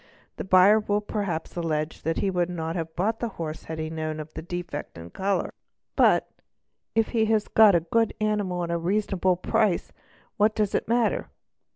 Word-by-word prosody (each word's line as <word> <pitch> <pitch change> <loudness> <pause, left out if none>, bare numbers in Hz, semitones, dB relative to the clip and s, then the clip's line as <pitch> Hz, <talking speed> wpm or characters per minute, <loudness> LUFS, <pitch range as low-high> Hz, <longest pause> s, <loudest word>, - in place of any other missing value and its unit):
The - - -4
buyer 190 +3 +6
will 210 -1 0
perhaps 200 -6 -4
allege 160 -2 -2
_ - - -26
that 165 0 -1
he 195 - 0
would 180 -1 0
not 165 -2 -4
have 160 -2 -4
bought 215 +5 0
the 235 - -1
horse 155 -2 -4
if 160 - -4
he 160 - -3
had 155 +1 -5
known 155 -1 -3
of 155 0 -8
the 160 - -6
defect 175 - -6
in 85 +1 -10
colour, 195 - -1 0.4
but - - +4 0.7
if 225 -1 +2
he 225 -2 +2
has 220 -1 +1
got 215 -4 +6
a 170 - +3
good 225 +7 +1
animal 205 -4 0
at 170 - -3
a 170 - 0
reasonable 190 0 +1
price 185 +1 0 0.5
what 210 +1 +3
does 210 -2 0
it - - 0
matter? 235 0 +1
180 Hz, 200 wpm, -26 LUFS, 165-210 Hz, 0.7 s, buyer